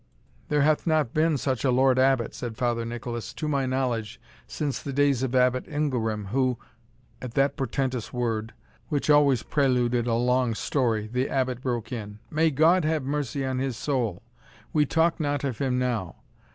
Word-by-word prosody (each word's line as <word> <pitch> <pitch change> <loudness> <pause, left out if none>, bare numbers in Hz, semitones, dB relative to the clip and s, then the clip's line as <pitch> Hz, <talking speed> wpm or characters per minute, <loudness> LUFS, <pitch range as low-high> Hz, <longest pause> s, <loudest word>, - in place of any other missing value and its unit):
"There 150 -1 +3
hath 155 +2 +2
not 155 -7 +1
been 155 -1 +2
such 130 -2 -2
a 135 - +3
Lord 130 +1 +3
Abbot," 130 -3 +2
said 115 -3 -6
Father 120 -2 0
Nicholas, 120 0 -5
"to 155 - -3
my 140 -3 0
knowledge, 125 -5 -2 0.3
since 145 -5 -3
the 140 - -5
days 140 -2 +2
of 130 -1 -1
Abbot 125 0 +2
Ingelram, 115 -9 -2
who 130 +1 +1 0.3
" 125 - -34
At 125 -2 -7
that 140 0 +2
portentous 130 -2 -2
word, 115 -2 -2 0.3
which 150 0 +1
always 140 -4 +4
preluded 125 -4 +1
a 115 - +2
long 125 0 +1
story, 115 -4 0
the 125 +5 -2
Abbot 130 -2 -1
broke 120 -2 -3
in. 105 -4 -6
"May 160 +1 +3
God 160 +5 +4
have 155 -2 0
mercy 140 0 -2
on 130 -1 -1
his 130 -3 -2
soul! 115 -9 -2 0.5
we 150 -2 +3
talk 165 +3 +2
not 145 -2 -1
of 130 -5 -3
him 130 -2 0
now. 120 -9 -1
130 Hz, 180 wpm, -26 LUFS, 120-145 Hz, 0.5 s, always